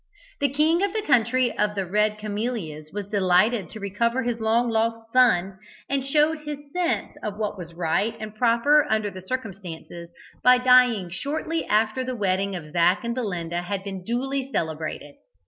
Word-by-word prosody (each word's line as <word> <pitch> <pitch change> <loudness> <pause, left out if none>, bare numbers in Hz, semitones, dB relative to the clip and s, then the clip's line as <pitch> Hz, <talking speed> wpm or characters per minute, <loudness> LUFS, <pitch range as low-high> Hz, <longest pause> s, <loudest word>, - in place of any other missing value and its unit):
The 285 - +2
king 310 +5 +2
of 400 -1 0
the 435 -1 -2
country 250 - +2
of 210 0 +1
the 195 -1 -1
Red 210 +3 +1
Camellias 205 -8 -4
was 205 -1 -4
delighted 195 0 +2
to 220 - -8
recover 235 +6 -1
his 235 -1 -2
long 225 +2 +2
lost 225 0 -1
son, 195 -7 +3 0.3
and 275 -1 -1
showed 300 +3 +2
his 300 -1 -5 0.2
sense 355 -1 -1
of 210 -1 -4
what 210 -2 -2
was 170 -3 -9
right 180 +7 0
and 215 -1 -7
proper 245 +6 +3
under 215 -2 0
the 185 - -9
circumstances 185 -6 -6 0.3
by 250 0 +7
dying 250 -7 +4
shortly 310 - -3
after 220 +4 +1
the 255 0 -4
wedding 195 -1 0
of 155 -4 -8
Zac 175 +4 +3
and 235 0 -2
Belinda 175 -8 -3
had 195 +2 -4
been 195 -2 -6
duly 265 +4 -2
celebrated. 155 - -4
220 Hz, 170 wpm, -24 LUFS, 190-255 Hz, 0.3 s, by